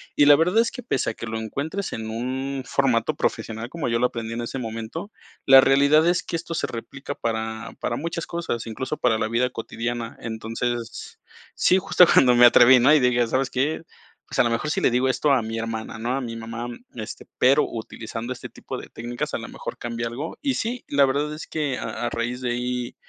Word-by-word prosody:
Y 145 - +5
la 145 0 +9
verdad 180 +8 +3
es 235 - 0
que 250 - -8
pese 180 - 0
a - - -3
que - - -7
lo 110 0 -4
encuentres 145 - -4
en 110 0 -5
un 130 +3 -3
formato 125 -3 +1
profesional, 115 +2 -2
como 165 -5 -3
yo 115 - +1
lo 125 - +3
aprendí 115 -2 -3
en 120 - -3
ese 120 +3 -4
momento, 115 - -6 0.4
la 135 -1 +10
realidad 140 +4 +5
es 180 +1 +2
que - - -4
esto 165 0 -4
se 165 - -1
replica 140 +4 -7
para, 110 0 -3
para 120 - -1
muchas 170 +1 -4
cosas, 170 -9 -3
incluso, 130 +6 -4
para 115 -3 +2
la 110 - 0
vida 120 +3 +1
cotidiana. 115 0 -4
Entonces 115 +1 -4 0.4
sí, 185 - +4
justo 190 -1 +5
cuando 125 -2 +6
me 120 0 +8
atreví, 120 +1 +8
¿no? 130 +5 +6
Y 155 - +6
dije: 125 -1 +3
"¿Sabes 130 +2 0
qué? 145 +5 -1 0.5
Pues - - -4
a - - +7
lo 120 - +2
mejor 115 +6 -1
si - - 0
le - - +3
digo 125 +2 +2
esto 145 +3 +2
a 130 - +3
mi 110 +1 -4
hermana, 115 0 -4
¿no? 120 +3 -1
A 135 - -2
mi 115 -2 -5
mamá", 115 +1 -5 0.3
este, 110 -2 -7
pero 135 +4 +4
utilizando 115 +1 -6
este 125 - -9
tipo - - -7
de - - -9
técnicas, 120 +1 -5
a - - 0
lo - - -7
mejor - - -7
cambia 115 0 -3
algo. 135 +8 -6
Y 280 -2 +1
sí, 235 +2 -3
la 140 -1 +4
verdad 145 +3 -1
es 155 - -8
que 150 -4 -2
a - - -4
a - - 0
raíz 120 +1 -3
de 125 -1 -1
ahí 125 0 -3
125 Hz, 225 wpm, -24 LUFS, 115-145 Hz, 0.5 s, la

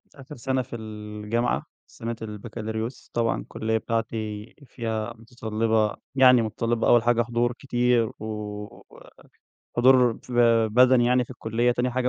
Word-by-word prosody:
آخِر 140 +2 -11
سَنة 130 +2 -1
في 125 -1 -8
الجامعة 105 +1 -3 0.2
سَنة 115 0 -6
البكالوريوس، 110 +2 -6
طبعًا 115 -1 0
الكُلّية 110 0 -2
بتاعتي 110 -1 -3
فيها 115 -2 -4
مُتَطلِّبة 110 -2 -1 0.2
يعني 130 -2 +7
مُتَطلِّبة 115 +1 -1
أول 120 -1 +5
حاجة 120 0 +3
حضور 120 +1 0
كتير 120 -3 +1
و 105 -1 -5 1.1
حضور 125 -1 +5 0.2
ب 125 - -4 0.4
بَدَني 125 -1 +6
يعني 125 0 +3
في - - -18
الكُلّية، 120 -1 0
تاني 125 +1 -1
حاجة 125 0 0
115 Hz, 130 wpm, -25 LUFS, 110-125 Hz, 1.1 s, يعني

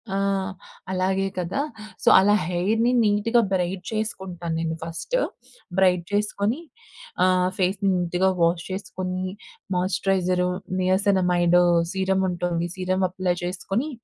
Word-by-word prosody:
ఆ! - - +1 0.7
అలాగే 190 +1 0
కదా! 180 +10 -1 0.4
సో, - - -6
అలా 205 +2 +4
హెయిర్‌ని 220 +7 +1
నీట్‌గా 215 +3 +3
బ్రైడ్ 180 0 -1
చేసుకుంటాను 185 -6 -3
నేను 165 -1 -2
ఫస్టు. 170 - -2 0.6
బ్రైడ్ 180 -2 +4
చేసుకొని, 210 +5 0 0.6
ఆహ్, 185 0 +3
ఫేస్‌‌ని 195 +1 +1
నీట్‌గా 180 +2 +1
wash 170 0 +2
చేసుకొనీ, 185 -1 -4 0.5
moisturiser, 180 -1 +1 0.3
niacinamide 180 -2 +3 0.3
సీరముంటుంది, 180 -3 0
serum 185 0 0
apply 180 -1 -1
చేసుకొని, 195 - -2
185 Hz, 105 wpm, -24 LUFS, 180-195 Hz, 0.7 s, అలా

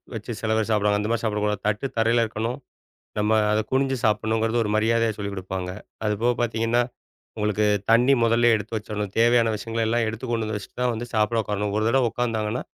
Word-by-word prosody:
வச்சு 110 +2 -6
சில 110 - -1
பேர் 110 0 0
சாப்பிடுவாங்க. 105 -1 +2
அந்த 105 - -2
மாரி 115 - 0
சாப்பிடக் 105 -1 0
கூடாது. 105 -1 -1
தட்டு 105 +6 0
தரையில 115 +1 +3
இருக்கணும். 115 +3 -3 0.6
நம்ம 105 +1 +2 0.2
அதை 110 0 +2
குனிஞ்சு 135 0 +1
சாப்படணும்கிறது 110 +2 +1
ஒரு 105 - -2
மரியாதையா 115 0 +2
சொல்லிக் 100 -1 -4
கொடுப்பாங்க. 95 0 -4 0.4
அது 105 - +1
போகப் 120 0 +1
பாத்தீங்கன்னா 115 +1 +1 0.5
உங்களுக்குத் 105 -1 +1
தண்ணீ 120 +4 +5
முதல்லயே 115 0 +4
எடுத்து 110 +2 -5
வச்சிரணும். 105 -2 -4
தேவையான 115 -1 +4
விஷயங்களை 115 +1 -2
எல்லாம் 115 0 +1
எடுத்துக் 110 +3 -5
கொண்டு 115 -1 0
வந்து 110 -1 -3
வச்சிட்டுதான் 125 +4 -2
வந்து 120 +2 -5
சாப்ட 110 +1 +2
உக்காரணும். 105 0 -2
ஒரு 110 - 0
தடவை 125 0 +3
உக்கார்ந்தாங்கன்னா, 115 -1 -2
110 Hz, 190 wpm, -24 LUFS, 105-115 Hz, 0.6 s, தண்ணீ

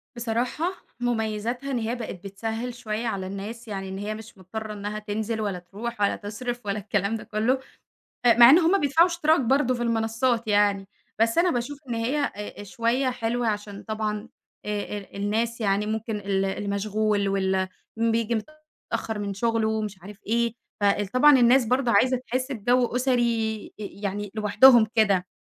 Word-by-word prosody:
بصراحة 245 +10 -1 0.3
مميزاتها 240 +2 -2
إن 250 - 0
هي 230 +2 -2
بقت 230 -5 -5
بتسهّل 225 +5 -4
شوية 230 -1 -4
على 190 -4 -3
الناس 215 +5 -7
يعني 195 -2 -5
إن 190 - -5
هي 210 +2 -4
مش 220 -2 -11
مضطرة 215 +3 -6
إنّها 210 +1 -5
تنزل 215 +1 -3
ولا 195 -4 -2
تروح 210 +5 -7
ولا 200 - +3
تصرف 240 +3 -5
ولا 200 +1 -1
الكلام 205 +1 -1
ده 220 - -6
كله، 225 +5 0 0.7
آآ 235 - +8
مع 240 0 +10
إن 320 +6 +8
هُم 360 +4 +3
بيدفعوا 310 +5 +4
اشتراك 325 -3 +2
برضه 255 +1 +2
في 240 -1 -2
المنصّات 230 +1 0
يعني. 205 -1 +2 0.3
بس 230 +4 +2
أنا 355 +1 +4
باشوف 255 +4 -3
إن 235 - -1
هي 235 +6 -1
آآ، 285 - 0 0.3
آآ - - -6
شوية 235 +6 0
حلوة 240 -1 -1
عشان 205 -1 -3
طبعًا 215 0 -3 0.4
آآ 210 0 -3
ال 195 - -11
الناس 225 +3 -1
يعني 200 0 +1
ممكن 220 0 -2
ال 195 -1 0
اللي 195 +1 -3
مشغول 205 0 0
واللي 190 -1 +1 0.3
م 230 0 +2
بييجي 230 0 0 0.6
متأخر 225 -2 -2
من 200 -1 -3
شُغله 225 +1 0
ومش 215 -3 -2
عارف 200 +2 -11
إيه، 235 0 +1 0.3
فال 205 0 +2
طبعًا 255 +7 +6
الناس 245 +1 +5
برضه 250 0 +1
عايزة 255 0 +4
تحس 255 +2 -3
بجو 245 +2 +2
أُسري 235 -4 +1
أ - - -5 0.2
يعني 205 0 -3
لوحدهم 220 +2 +6
كده 195 -4 +3
220 Hz, 175 wpm, -25 LUFS, 205-240 Hz, 0.7 s, مع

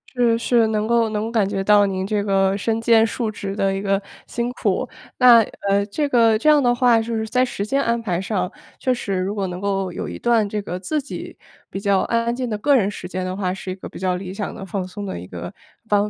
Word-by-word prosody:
是， 235 -2 +3
是， 230 -1 +2
能 215 0 -1
够 235 -1 +2
能 210 0 -2
够 230 - -4
感 215 -4 +2
觉 195 -1 -2
到 205 0 +5
您 190 -1 -2
这 205 -1 0
个 195 -1 +2
身 225 +3 -1
兼 225 -1 +4
数 230 0 -2
职 200 -2 -5
的 195 -2 +1
一 195 - -3
个 195 0 0 0.2
辛 235 0 -3
苦， - - -1 0.3
那 245 -2 +8 0.3
呃， 200 0 +2
这 290 +9 -2
个 230 -5 +4
这 305 - +3
样 300 -1 +6
的 245 -1 +4
话 245 -1 +4
就 230 +1 -3
是 220 0 -2
在 250 +3 +2
时 200 -5 -3
间 275 +6 +1
安 235 0 0
排 180 -6 -1
上， 185 -2 -2 0.3
确 255 - +1
实 200 -6 -3
如 190 +3 -2
果 195 -2 -1
能 180 0 -5
够 195 -1 -1
有 - - -5
一 - - -6
段 230 -3 +2
这 210 +1 -3
个 180 -2 -5
自 295 +11 -2
己 275 - -8 0.3
比 195 - -5
较 200 -1 +2
安 230 0 0
安 235 +1 0
静 250 -1 -3
的 210 - -2
个 280 +7 +3
人 205 -6 +3
时 190 -3 -7
间 185 0 -4
的 185 0 -3
话， 185 -2 -1
是 190 0 -7
一 - - -4
个 190 - -9
比 - - -10
较 185 -1 0
理 185 0 -6
想 205 +1 -4
的、 195 - -7
放 190 0 -4
松 205 +2 -7
的 190 - -5
一 90 - -9
个 90 -1 -7 0.3
方 205 0 +2
210 Hz, 285 characters per minute, -21 LUFS, 195-230 Hz, 0.3 s, 那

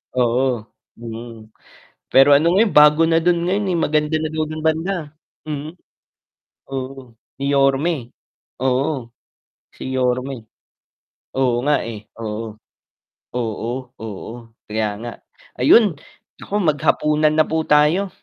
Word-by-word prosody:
Oo, 125 -2 +1 0.3
mm, 115 -1 -9 0.6
pero 135 +2 +6
ano 165 +4 +4
ngayon, 215 -1 +3
bago 150 +2 +7
na 165 0 +3
do'n 170 0 +2
ngayon, 200 +3 0
eh, 175 - +1
maganda 150 0 +1
na 155 0 -2
daw 155 0 -1
do'n 155 0 -6
banda, 160 +5 +1 0.5
hmm. 150 0 -4 1.0
Oo, 130 -2 -6 0.3
ni 135 - -4
Yorme, 140 +4 +3 0.7
oo, 130 -1 0 0.7
si 130 - -6
Yorme. 125 -2 -1 0.9
Oo 125 -2 +1
nga, 150 0 +3
eh, 110 -2 -7 0.2
oo. 110 0 -5 0.7
Oo, 120 +2 -4
oo, 110 +2 -7 0.2
kaya 105 -1 -2
nga, 120 +2 -6 0.4
ayun, 195 - +5 0.5
naku - - -10
maghapunan 150 -3 +2
na 155 - +5
po 160 0 -1
tayo. 155 +6 +3
135 Hz, 120 wpm, -20 LUFS, 120-155 Hz, 1.0 s, bago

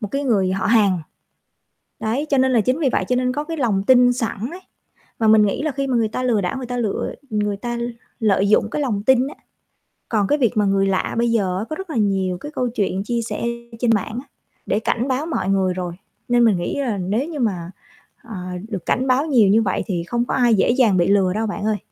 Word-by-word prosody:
một 210 - -4
cái 280 +1 -2
người 195 -7 +2
họ 190 - -1
hàng. 205 -5 +3 1.0
Đấy, 240 +7 -1
cho 275 - +3
nên 260 0 +3
là 235 - +4
chính 255 +8 0
vì 290 -5 +2
vậy - - +1
cho 250 - +1
nên 250 0 +1
có 295 +3 -3
cái 325 +1 -5
lòng 220 -8 +1
tin 250 -1 +6
sẵn 240 -2 -2
ấy 360 +2 -9 0.6
và 220 -1 +2
mình 215 -1 +6
nghĩ 200 - -2
là 310 - 0
khi 275 0 -2
mà 255 -2 0
người 225 -2 +2
ta 220 - -4
lừa 240 -4 +2
đảo, 180 +6 -2
người 255 -2 -5
ta 245 - -4
lựa 225 -5 -2 0.2
người 210 -1 -1
ta 240 +3 -4 0.4
lợi 200 -2 +2
dụng 215 0 +3
cái 300 - -2
lòng 210 -7 -1
tin 260 +1 +4
á. - - -9 0.8
Còn 210 -4 +1
cái 295 - +2
việc 245 -5 +1
mà 210 - +3
người 195 0 +2
lạ 190 -1 -1
bây 235 0 +2
giờ 190 -5 0
á 200 - -2
có 310 - -3
rất 385 +2 -8
là 310 - -5
nhiều 190 -4 0
cái 295 +11 -8
câu 250 -1 0
chuyện 195 -4 -1
chia 235 +2 -1
sẻ 230 - -4 0.4
trên 235 -1 +2
mạng 220 +2 -2
á 275 - -20 0.4
để 205 - 0
cảnh 235 +3 -1
báo 265 +3 -1
mọi 315 - -2
người 190 -2 +2
rồi 180 -1 -4 0.4
nên 240 0 +4
mình 220 -5 +4
nghĩ 175 +10 -3
là 235 -6 -1
nếu 205 - -1
như 305 -4 -5
mà, 185 -7 -2 0.5
ờ, 230 -3 -9 0.3
được 195 -6 -5
cảnh 260 +2 0
báo 260 +4 +2
nhiều 240 -10 +4
như 220 +3 +4
vậy 190 -3 -1
thì 175 -5 -2
không 240 +8 -1
có - - -2
ai 240 -4 +4
dễ 195 - +2
dàng 235 -7 +3
bị 175 - +3
lừa 195 -2 +3
đâu 220 +1 -1
bạn 205 - -4
ơi. 215 -1 +1
225 Hz, 255 wpm, -21 LUFS, 195-255 Hz, 1.0 s, tin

